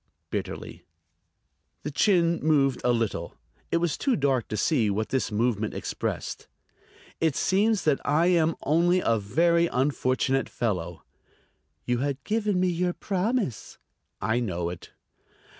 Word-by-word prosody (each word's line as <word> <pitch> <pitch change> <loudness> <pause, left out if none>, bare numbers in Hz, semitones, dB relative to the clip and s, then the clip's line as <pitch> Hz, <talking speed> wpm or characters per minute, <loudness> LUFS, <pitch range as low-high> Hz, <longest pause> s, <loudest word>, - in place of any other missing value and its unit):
bitterly. - - -5 1.0
The 150 - -4
chin 170 +1 +3
moved 140 -4 +2
a 125 - +3
little. 115 -8 -2 0.3
It - - +2
was 170 -3 -1
too 270 -3 +2
dark 135 -4 +1
to 110 - -4
see 115 -2 +2
what 110 +2 -1
this 130 -3 -1
movement 110 -1 0
expressed. - - -4 0.7
"It 160 -4 +1
seems 205 +2 +2
that 150 -3 +2
I 160 +3 +2
am 165 -3 +3
only 170 +4 +3
a 115 -7 +2
very 170 +11 +2
unfortunate 135 -1 0
fellow." 90 -7 -3 0.8
"You 120 -1 0
had 140 0 -2
given 210 -3 0
me 185 0 +2
your 175 +1 0
promise." 195 - -2 0.4
"I 110 +2 0
know 90 -7 -2
it." 90 - -10
140 Hz, 135 wpm, -26 LUFS, 115-175 Hz, 1.0 s, chin